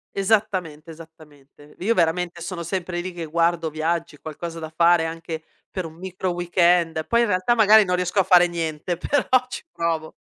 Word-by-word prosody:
Esattamente, 190 -6 -1
esattamente. 150 -3 -16
V - - -21
io, 230 - +2
veramente, 175 -1 0
sono 170 0 -5
sempre 175 0 -3
lì 185 +1 -5
che 170 -1 -6
guardo 165 +1 0
viaggi, 160 0 -2
qualcosa 165 +3 -7
da 160 - -6
fare 170 0 +4
anche 165 0 -6 0.3
per 185 -3 -5
un 160 0 -10
micro 185 +1 -4
weekend, 175 -2 +1
poi 235 0 +2
in 235 - +2
realtà 185 +4 +1
magari 220 -2 +6
non 180 0 0
riesco 180 +2 0
a 195 - +5
fare 180 -1 +5
niente, 165 0 -3
però 290 +10 -1 0.2
ci - - -7
provo. 165 -2 -2
170 Hz, 180 wpm, -23 LUFS, 160-185 Hz, 0.3 s, magari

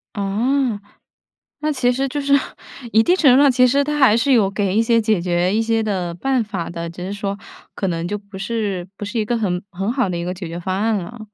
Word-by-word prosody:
哦， 220 +4 0 0.8
那 305 0 -1
其 255 -3 +1
实 270 +2 -1
就 290 +2 -3
是 280 0 +1 0.6
一 220 0 +5
定 355 - +3
程 280 -9 +5
度 270 - +6
上 285 -1 +6
其 255 0 +4
实 280 +3 +2
他 300 +1 -2
还 250 -5 +5
是 270 +4 +1
有 220 -6 +4
给 195 -1 -1
一 225 - +4
些 230 0 +3
解 215 -4 +1
决 175 +1 +1
一 225 - +2
些 225 0 +1
的 185 -5 -2
办 260 +6 0
法 200 -6 -5
的， 170 0 -5
只 175 +2 -8
是 195 - -4
说， 200 -1 -3 0.4
可 195 - -2
能 170 -1 -2
就 205 +3 -2
不 200 -1 -12
是 195 -3 -3
不 205 - -5
是 225 +3 -3
一 215 - 0
个 235 +2 0
很 180 -5 -1
很 195 +3 -2
好 250 -6 0
的 175 - -2
一 170 - -3
个 180 +1 -3
解 185 -1 -7
决 165 +1 -6
方 185 +2 -2
案 225 0 +1
了。 205 +6 -7
210 Hz, 270 characters per minute, -20 LUFS, 185-245 Hz, 0.8 s, 度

